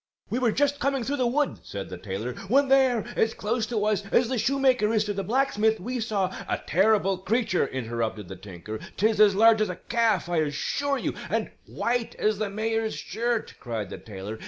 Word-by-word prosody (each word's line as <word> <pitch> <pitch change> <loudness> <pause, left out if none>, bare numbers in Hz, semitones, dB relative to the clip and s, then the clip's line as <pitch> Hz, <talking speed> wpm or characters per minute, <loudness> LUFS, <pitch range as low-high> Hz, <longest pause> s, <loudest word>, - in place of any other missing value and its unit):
"We 240 - 0
were 245 -3 +2
just 285 +3 +1
coming 275 -1 0
through 285 +4 -2
the 250 -2 +2
wood," 285 +4 0
said 100 -1 -7
the 90 - -6
tailor, 105 +6 -4
"when 270 +5 +3
there, 260 -5 +4
as 225 - +1
close 220 +1 -1
to 215 -3 -1
us 210 -1 +1
as 235 -1 +3
the 255 -2 0
shoemaker 255 -2 +2
is 215 -2 +2
to 205 -1 -2
the 195 0 -3
blacksmith, 220 -1 +1
we 245 +6 -3
saw 205 -4 -1
" - - -12
"A - - +1
terrible 195 0 +3
creature," 190 - +1
interrupted 115 -5 -3
the - - -7
tinker. 100 +2 -8 0.2
"'Tis 215 +1 +2
as 205 -2 +6
large 220 +1 +6
as 215 - +1
a 180 - -3
calf, 225 -3 +1
I 175 -1 -1
assure 160 - 0
you - - -2
" - - -10
"And - - -1 0.2
white 240 -1 -1
as 215 -1 0
the 215 -2 -1
mayor's 220 +2 -1
shirt," 235 0 -2
cried 110 -6 -4
the - - -6
tailor. 105 +1 -7
215 Hz, 210 wpm, -26 LUFS, 180-240 Hz, 0.2 s, as